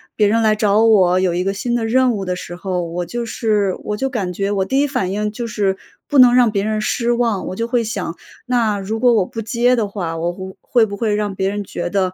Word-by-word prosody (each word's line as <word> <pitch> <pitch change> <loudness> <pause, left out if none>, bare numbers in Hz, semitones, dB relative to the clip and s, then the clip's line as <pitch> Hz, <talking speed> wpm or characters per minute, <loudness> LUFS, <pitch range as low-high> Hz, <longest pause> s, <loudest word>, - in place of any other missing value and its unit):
别 210 - +3
人 225 +3 +2
来 215 -1 +3
找 210 0 +2
我， 185 -5 +4
有 185 -2 +1
一 180 +1 -1
个 195 - 0
新 240 +4 -3
的 235 -2 -1
任 255 +2 +3
务 200 -3 -3
的 180 -1 -2
时 175 -1 -8
候， 180 -1 -3
我 175 +1 -4
就 235 +6 -4
是 210 -4 0
我 210 - -3
就 270 - -1
感 205 -9 -3
觉 195 +3 -2
我 195 -2 +1
第 265 +6 0
一 290 - +2
反 250 -9 -2
应 210 +1 -2
就 235 +2 -5
是 205 -3 0 0.3
不 285 - +2
能 250 -1 +8
让 245 -3 +4
别 200 -2 -1
人 215 0 -1
失 235 +2 0
望。 235 -4 0
我 185 - -5
就 230 +2 -2
会 240 -1 +1
想， 200 -6 -4 0.3
那 230 -5 +1
如 215 +3 -4
果 245 -1 +4
我 210 -5 +2
不 225 - -6
接 240 +3 +2
的 225 -4 0
话， 180 -5 -4
我 170 +2 -1
不 190 +1 -9
会 235 -3 +2
不 200 -2 -6
会 210 0 0
让 210 -1 -2
别 190 +1 0
人 205 0 -3
觉 175 -2 -5
得， 185 -1 0
210 Hz, 285 characters per minute, -19 LUFS, 190-235 Hz, 0.3 s, 能